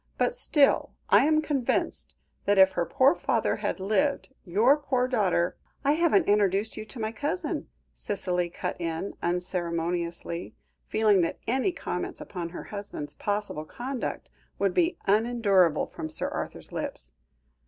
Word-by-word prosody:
But - - +1
still, 290 - +3 0.2
I - - +7
am 310 0 +3
convinced 275 -5 -1 0.3
that 205 0 +3
if 190 0 +7
her 175 -2 -1
poor 275 +1 +4
father - - 0
had - - -2
lived, 265 +8 0
your 220 +9 +4
poor 265 -4 0
daughter 195 -8 +1
" - - -35
"I 280 - +5
haven't 335 +3 +3
introduced 205 +1 +2
you 215 - -6
to 235 +3 -10
my 220 0 -1
cousin," 290 - -3 0.3
Cicely 180 -3 -2
cut 175 - -5
in 165 +3 -3
unceremoniously, 170 -1 -2 0.3
feeling 210 -3 +3
that 165 - -1
any 260 +10 +1
comments - - -4
upon 175 -3 -5
her 175 - -7
husband's 200 -8 -6
possible 205 -3 -3
conduct 250 - -5 0.3
would 195 -2 +1
be 340 0 +2
unendurable 200 -6 +3
from 155 - -7
Sir 155 - -1
Arthur's - - -6
lips. - - -5
205 Hz, 145 wpm, -27 LUFS, 175-260 Hz, 0.3 s, I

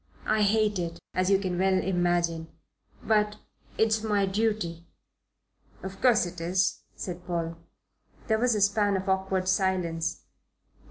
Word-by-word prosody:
I 215 0 +2
hate 210 -1 +2
it, 170 -1 -4
as 185 +1 +1
you 195 - +5
can 185 -2 -2
well 190 0 +3
imagine. 175 -3 0 0.6
But 210 -1 +2 0.4
it's 220 0 +2
my 205 -2 +1
duty." 195 -5 -1 1.0
"Of 190 0 -7
course 240 -7 +4
it 175 -1 -7
is," 180 +2 +1 0.2
said 180 -1 -6
Paul. 165 -1 -2 0.7
There 220 -1 +1
was 240 -1 +2
a 210 - 0
span 205 0 +3
of 190 +1 -5
awkward 190 -1 0
silence. 180 -3 0
190 Hz, 140 wpm, -27 LUFS, 175-210 Hz, 1.0 s, you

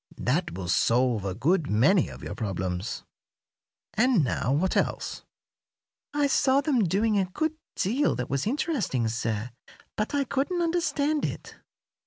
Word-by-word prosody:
That 160 +7 0
will 95 -2 -5
solve 115 +4 +2
a 95 -1 -2
good 155 - +1
many 135 - +4
of - - -11
your - - -5
problems. 95 -2 -3 0.9
And 230 - +3
now, 130 0 0
what 170 +7 +1
else?" - - -1 0.9
"I 290 0 +1
saw 275 -1 +3
them 275 -7 +2
doing 205 +4 +2
a 190 - +2
good 310 - -2 0.2
deal 250 +10 +1
that 125 -1 -3
was 140 +6 -1
interesting, 230 - 0
sir, 115 0 -2 0.4
but 215 +6 -2
I 285 - +2
couldn't 285 +7 -1
understand 310 -3 0
it." - - -4
185 Hz, 145 wpm, -27 LUFS, -, 0.9 s, many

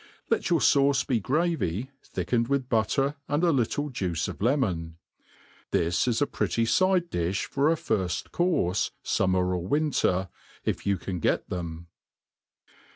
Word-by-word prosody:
Let - - +1
your 170 -2 +3
fauce 140 -1 +4
be 125 -4 +1
gravy, 135 - -1
thickened 115 -1 -1
with 135 -1 0
butter 135 +6 +1
and 145 +4 0
a 170 - +4
little 145 +2 0
juice 85 -8 -2
of - - -7
lemon. 95 - 0 0.7
This 85 +7 +1
is 120 +3 +2
a - - +2
pretty 105 - -1
fide 185 +4 +2
difh 90 +3 -1
for 140 +2 +1
a - - +3
firfl^ 95 - -2
courfe, 135 - +1 0.2
fummer 90 -1 +1
or 90 0 -4
winter, 135 - +1 0.4
if - - -2
you 100 -1 +2
can 90 0 -5
get - - 0
them. 85 -2 -5
115 Hz, 150 wpm, -27 LUFS, 90-145 Hz, 0.7 s, fauce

